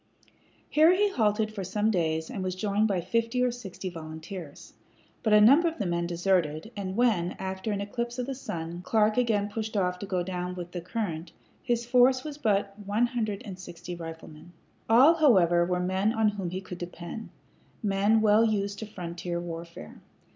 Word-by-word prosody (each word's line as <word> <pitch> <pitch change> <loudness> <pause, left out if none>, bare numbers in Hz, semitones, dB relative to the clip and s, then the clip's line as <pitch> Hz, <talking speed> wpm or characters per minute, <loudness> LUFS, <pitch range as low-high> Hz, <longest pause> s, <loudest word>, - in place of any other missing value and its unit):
Here 315 +3 +5
he 410 +1 +2
halted 215 - +1
for 200 -3 -4
some 210 +4 0
days 160 -4 -1
and 190 - -4
was 185 -1 -2
joined 205 +2 +1
by 190 -4 0
fifty 230 +6 0
or 250 - +2
sixty 200 -6 -7
volunteers; 160 -1 -8 0.5
but 220 - 0
a 210 - +7
number 275 +11 +6
of 330 - -3
the 205 - -2
men 170 -1 -1
deserted, 175 0 0
and 190 -2 -4
when, 210 -8 +2
after 190 +3 -4
an 200 -1 -2
eclipse 235 +4 -4
of 250 - -2
the 270 - -3
sun, 170 -9 -6
Clark 215 +2 +2
again 220 -5 +1
pushed 215 +1 -4
off 180 -2 0
to 200 - -6
go 185 -3 -1
down 180 0 -4
with 175 -1 -7
the 175 - -5
current, 175 -4 -4 0.3
his 240 -2 -1
force 255 +1 +4
was 300 -1 -7
but 205 -6 +3
about 205 -1 -13
one 210 +4 +2
hundred 225 -3 -3
and 190 -3 -8
sixty 175 -1 -8
riflemen. 165 0 -10 0.4
All, 255 +8 +7
however, 180 - +5
were 180 0 0
men 190 +4 +1
on 220 -2 +3
whom 200 -4 -4
he 185 +2 -4
could 180 -2 -9
depend 175 +5 -7 0.5
men 205 +2 +3
well 215 +1 +5
used 200 -2 0
to 220 - -6
frontier 175 -3 -5
warfare. 170 - -8
200 Hz, 190 wpm, -28 LUFS, 175-225 Hz, 0.5 s, a